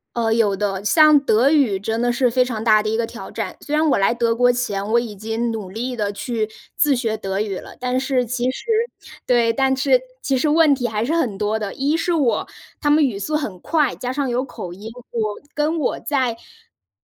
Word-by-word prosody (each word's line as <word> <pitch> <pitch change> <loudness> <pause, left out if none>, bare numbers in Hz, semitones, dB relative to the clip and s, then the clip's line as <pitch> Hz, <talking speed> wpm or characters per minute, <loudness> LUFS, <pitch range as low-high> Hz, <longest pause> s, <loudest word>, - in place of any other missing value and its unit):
呃， 230 -2 0
有 225 -3 +2
的， 200 0 -2
像 305 +2 +6
德 250 0 +3
语 270 -11 +2
真 220 +3 -2
的 245 +1 +2
是 250 +1 +2
非 250 +1 +2
常 225 -4 -4
大 215 -2 +4
的 215 - -1
一 220 - 0
个 230 0 0
挑 - - -9
战。 - - -5
虽 295 - -2
然 310 +1 +3
我 - - +3
来 195 +3 +3
德 235 -1 +1
国 245 +1 +4
前， 205 -5 -2
我 235 - +5
已 230 -3 -5
经 225 +3 -2
努 210 -5 -6
力 245 +5 -4
地 205 -3 -1
去 220 0 -2 0.3
自 290 -2 +3
学 225 -3 -1
德 195 -2 -3
语 200 -3 -3
了， - - -10
但 250 0 0
是 265 -1 0
其 245 +1 -3
实 365 - -9 0.6
对， 235 -2 +3
但 265 +2 +1
是 265 -1 +3 0.2
其 270 - 0
实 265 - +1
问 305 -1 +5
题 250 -2 -2
还 215 -1 -2
是 280 +7 -1
很 250 -12 0
多 210 +1 0
的， 210 -2 -4
一 285 +4 0
是 345 +1 0
我 285 -8 +1 0.3
他 295 - +1
们 305 +1 +5
语 245 -8 0
速 205 +10 -2
很 220 -12 -3
快， 300 - +1
加 250 0 -4
上 275 -1 -1
有 245 +2 -1
口 185 -8 -8
音， 200 +5 -9 0.2
我 215 -3 -2 0.2
跟 305 +2 0
我 285 - -1
在 260 -5 0
是 460 - -24
240 Hz, 250 characters per minute, -21 LUFS, 215-275 Hz, 0.6 s, 像